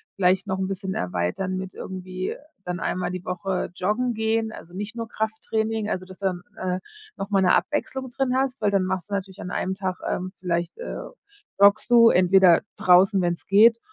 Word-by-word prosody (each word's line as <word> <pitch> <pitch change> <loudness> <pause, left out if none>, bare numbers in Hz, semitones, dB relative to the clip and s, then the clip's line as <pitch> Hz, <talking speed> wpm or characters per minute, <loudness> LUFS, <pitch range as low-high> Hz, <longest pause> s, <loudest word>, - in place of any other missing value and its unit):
vielleicht 185 0 +2
noch 190 0 -2
‘n 190 - -1
bisschen 190 0 -4
erweitern 90 - -2
mit 190 0 -6
irgendwie 185 0 -5 0.3
dann 180 0 -3
einmal 180 0 -2
die 185 -1 -6
Woche 180 +1 -2
joggen 220 +7 0
gehen, 220 0 0
also 175 -4 -11
nicht 205 +4 -5
nur 230 -1 -4
Krafttraining, 220 0 -2
also 185 -2 -3
dass 185 0 -13
dann, 185 -3 -1 0.2
äh, 185 -2 -2 0.4
nochmal 195 0 0
‘ne 180 - +5
Abwechslung 265 -3 -2
drin 260 -1 0
hast, 265 -2 0
weil 205 - +2
dann 195 -2 +2
machst 185 +1 -3
du - - -6
natürlich 195 -1 -4
an 180 - -6
einem 190 +1 -1
Tag, 190 -1 -3
ähm 185 +1 -2
vielleicht, 170 - -2
äh, 485 - -5 0.6
joggst 200 +3 +5
du 230 -1 +8
entweder 180 -2 +5 0.2
draußen, 185 +2 +5
wenn‘s 175 -1 -2
geht, 225 +4 +6
190 Hz, 185 wpm, -24 LUFS, 185-220 Hz, 0.6 s, du